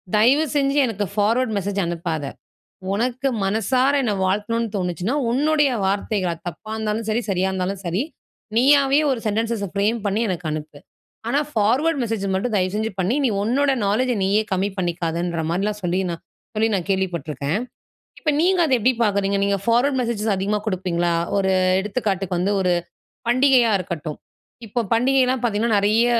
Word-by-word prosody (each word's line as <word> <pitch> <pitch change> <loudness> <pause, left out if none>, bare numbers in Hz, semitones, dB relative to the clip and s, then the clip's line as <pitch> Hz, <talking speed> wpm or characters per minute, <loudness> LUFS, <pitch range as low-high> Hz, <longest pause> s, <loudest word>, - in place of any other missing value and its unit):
தயவு 260 +9 +4
செஞ்சு 275 0 +2
எனக்கு 210 -4 -2
ஃபார்வர்ட் 220 +3 +1
மெசேஜ் 200 0 -2
அனுப்பாத. 170 -2 -3 0.7
உனக்கு 250 +5 0 0.2
மனசார 240 +7 +2
என்னை 220 -5 0
வாழ்த்தணும்னு 215 +4 0
தோணுச்சுனா 180 - -2 0.2
உன்னுடைய 295 +3 +3 0.2
வார்த்தைகள், 195 -2 0
அது 165 - -18
தப்பா 175 +6 -9
இருந்தாலும் 220 0 -2
சரி, 220 +2 +1
சரியா 190 0 +1
இருந்தாலும் 190 +1 -3
சரி. 175 +6 0 0.5
நீயாவே 275 +2 +5
ஒரு 255 -3 -1
சென்டென்ஸஸை 220 -1 -1
ஃப்ரேம் 210 +4 +1
பண்ணி 205 +2 0
எனக்கு 180 -3 -3
அனுப்பு. 150 -1 -6 0.5
ஆனா 275 - +2
ஃபார்வர்ட் 265 +9 +2
மெசேஜ 225 -4 -2
மட்டும் 220 +4 -1
தயவுசெஞ்சு 205 +4 0
பண்ணி, 190 +6 +1
நீ - - +4
உன்னோட 270 +6 +2 0.2
நாலெட்ஜ்ஜை 245 +4 +1
நீயே 205 +3 +2
கம்மி 190 +2 +1
பண்ணிக்காதன்ற 170 -1 -2
மாரிலாம் 205 +4 -1
சொல்லி, 180 +2 +1
நான் 170 -1 -6 0.3
சொல்லி 220 +1 +2
நான் 180 -3 -1
கேள்விப்பட்டுருக்கேன். 170 -4 -1 0.6
இப்ப 305 - +1
நீங்க 365 +1 +3
அதை 270 - +1
எப்படி 255 +4 +3
பார்க்குறீங்க? 200 -2 +1
நீங்க 200 0 +1
ஃபார்வர்ட் 245 +4 +2
மெசேஜஸ் 225 -3 -1
அதிகமா 205 +2 -1
குடுப்பீங்களா? 175 -3 0 0.2
ஒரு 190 -1 +2 0.3
எடுத்துக்காட்டுக்கு 195 -3 -2
வந்து, 185 +3 +1
ஒரு 180 -1 +2 0.5
பண்டிகையா 255 -1 +4
இருக்கட்டும். 165 -4 -5 0.5
இப்போ 230 +4 -2
பண்டிகைலாம் 255 +1 +2
பார்த்தீங்கன்னா, 220 -1 +1
நெறைய 215 +4 +3
210 Hz, 150 wpm, -22 LUFS, 185-240 Hz, 0.7 s, நீயாவே